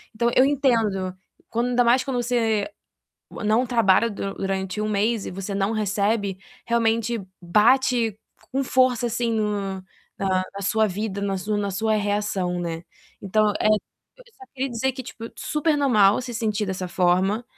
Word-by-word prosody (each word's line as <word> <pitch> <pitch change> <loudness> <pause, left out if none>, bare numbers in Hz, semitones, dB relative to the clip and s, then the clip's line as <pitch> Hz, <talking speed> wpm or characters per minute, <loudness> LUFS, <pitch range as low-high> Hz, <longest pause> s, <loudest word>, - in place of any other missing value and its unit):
Então, 235 +1 +1
eu 255 - +7
entendo 225 -10 +1 0.4
quando 235 +2 0
ainda 245 0 +3
mais 245 +2 +4
quando 265 -2 -2
você 225 -1 +1 0.6
não 220 +4 +1
trabalha 230 -2 +3
du 195 -1 -4
durante 190 0 -3
1 215 - -1
mês 210 +1 0
e - - -4
você 195 +2 -5
não 195 +3 0
recebe, 205 -1 0 0.3
realmente 230 -1 +1 0.2
bate 230 +3 +3 0.3
com 270 +1 0
força 255 -2 +2
assim 235 0 -1
no 200 -3 -2 0.3
na 190 -1 +1
na 200 - -6
sua 220 +2 +2
vida, 200 +1 -4
na 195 -1 -1
sua 210 +3 -2
na 200 -1 -1
sua 215 +3 0
reação, 205 -4 -1
né. 165 -1 -4 0.4
Então, 210 +2 +2
eh, - - +2 0.5
eu - - -17
só 395 - -13
queria 270 0 -2
dizer 250 +2 -1
que, 260 - -7
tipo, 230 -2 -9
super 300 +1 0
normal 220 -8 +4
se 245 -1 -6
sentir 215 -2 -1
dessa 185 -1 -3
forma, 185 +5 +1
215 Hz, 165 wpm, -24 LUFS, 195-240 Hz, 0.6 s, eu